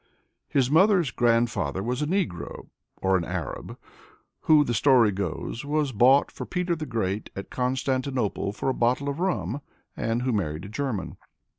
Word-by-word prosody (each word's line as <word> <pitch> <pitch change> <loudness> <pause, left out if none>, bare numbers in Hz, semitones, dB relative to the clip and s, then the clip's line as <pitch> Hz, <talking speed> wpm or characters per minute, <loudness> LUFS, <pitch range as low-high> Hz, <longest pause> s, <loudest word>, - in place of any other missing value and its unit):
^ - - -43 0.3
"* - - -54
His 135 -1 +2
mother's 180 - +4
grandfather 115 -8 +1
was 125 +4 -2
a 150 - 0
Negro 175 - -3 0.3
(or 95 0 +4
an 85 - -2
J^j^) 90 -3 -5 0.6
who, 155 -2 +5
the 120 - -2
story 120 -2 +5
goes, 100 +4 -4
was 145 -1 0
bought 130 +5 +4
for - - -7
Peter 180 -1 -1
the 155 -2 -5
Great 105 -4 -2
at 100 - -7
Constantinople 130 -4 -1
for 105 - -5
a - - +1
bottle 125 +4 +1
of 140 +3 -4
rum, 130 - -1 0.3
and 115 +2 -1
who 130 - +1
married 80 -4 -2
a - - -8
German. 110 -2 -3
125 Hz, 170 wpm, -26 LUFS, 100-145 Hz, 0.6 s, who